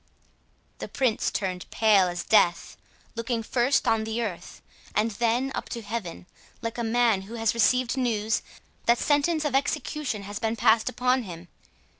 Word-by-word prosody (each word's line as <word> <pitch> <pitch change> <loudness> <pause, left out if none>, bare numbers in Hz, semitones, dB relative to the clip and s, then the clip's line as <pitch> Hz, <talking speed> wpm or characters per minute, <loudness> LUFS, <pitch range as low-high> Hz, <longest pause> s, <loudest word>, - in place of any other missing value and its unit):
_" - - -40
The - - -5
Prince 250 -5 0
turned 185 -3 -3
as - - -12
pale 210 -4 +5
as 175 -1 -4
death, 180 -6 +2 0.4
looked 230 0 -2
first 250 +4 +1
on 225 -1 +2
the 225 +2 -2
earth, 180 -5 -6 0.4
and 220 +2 +2
then 240 +5 0
up - - -5
to 235 -2 -5
heaven, 205 -6 -5 0.3
like 230 +1 -5
a - - -1
man 230 -3 +2
who 235 - -7
has 225 -1 +1
received 250 +3 +2
news 225 -4 0 0.5
that 235 +1 +5
sentence 300 +3 +1
of 290 - -1
execution 270 -4 -1
has 205 +1 -6
been 225 0 -1
passed 220 +1 +3
upon 255 +1 +1
him. 175 -5 -9
230 Hz, 170 wpm, -26 LUFS, 210-250 Hz, 0.5 s, pale